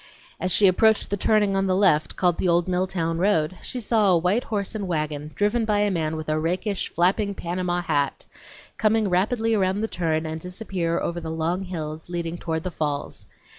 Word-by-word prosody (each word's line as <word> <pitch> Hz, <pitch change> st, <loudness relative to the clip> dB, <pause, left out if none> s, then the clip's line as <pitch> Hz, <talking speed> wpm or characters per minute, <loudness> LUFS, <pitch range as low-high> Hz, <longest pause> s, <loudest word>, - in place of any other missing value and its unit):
As 185 Hz, -, -1 dB
she 200 Hz, -, +5 dB
approached 215 Hz, +4 st, +4 dB
the -, -, +2 dB
turning 205 Hz, 0 st, +2 dB
on 195 Hz, 0 st, +1 dB
the 185 Hz, -, +2 dB
left 185 Hz, -6 st, +3 dB
called 175 Hz, -2 st, +1 dB
the -, -, +1 dB
old 175 Hz, +1 st, +3 dB
Milltown 180 Hz, -2 st, -1 dB
road, 185 Hz, -3 st, +2 dB
she 255 Hz, -, -5 dB
saw 220 Hz, -3 st, +2 dB
a 180 Hz, -, +5 dB
white 180 Hz, +8 st, +1 dB
horse 205 Hz, -2 st, -2 dB
and 205 Hz, -3 st, -3 dB
wagon, 150 Hz, -3 st, -2 dB
driven 210 Hz, +3 st, +1 dB
by 210 Hz, -2 st, +1 dB
a 205 Hz, -1 st, +2 dB
man 160 Hz, -3 st, -1 dB
with 155 Hz, 0 st, -6 dB
a 155 Hz, 0 st, +1 dB
rakish, 180 Hz, +5 st, -1 dB
flapping, 200 Hz, +4 st, +1 dB
Panama 175 Hz, 0 st, -2 dB
hat, 145 Hz, -4 st, -1 dB, 0.5 s
come 215 Hz, 0 st, +3 dB
rapidly 220 Hz, +5 st, +1 dB
around 195 Hz, -1 st, +1 dB
the 220 Hz, -, 0 dB
turn 160 Hz, -5 st, -1 dB
and 160 Hz, 0 st, -4 dB
disappear 180 Hz, -2 st, -2 dB
over 170 Hz, 0 st, -3 dB
the 160 Hz, -, -5 dB
long 165 Hz, +3 st, -1 dB
hills 160 Hz, -4 st, -6 dB
leading 170 Hz, -1 st, -3 dB
down 165 Hz, -1 st, -3 dB
to -, -, 0 dB
the 185 Hz, -, -4 dB
falls. 145 Hz, -3 st, -3 dB
180 Hz, 205 wpm, -24 LUFS, 165-200 Hz, 0.5 s, she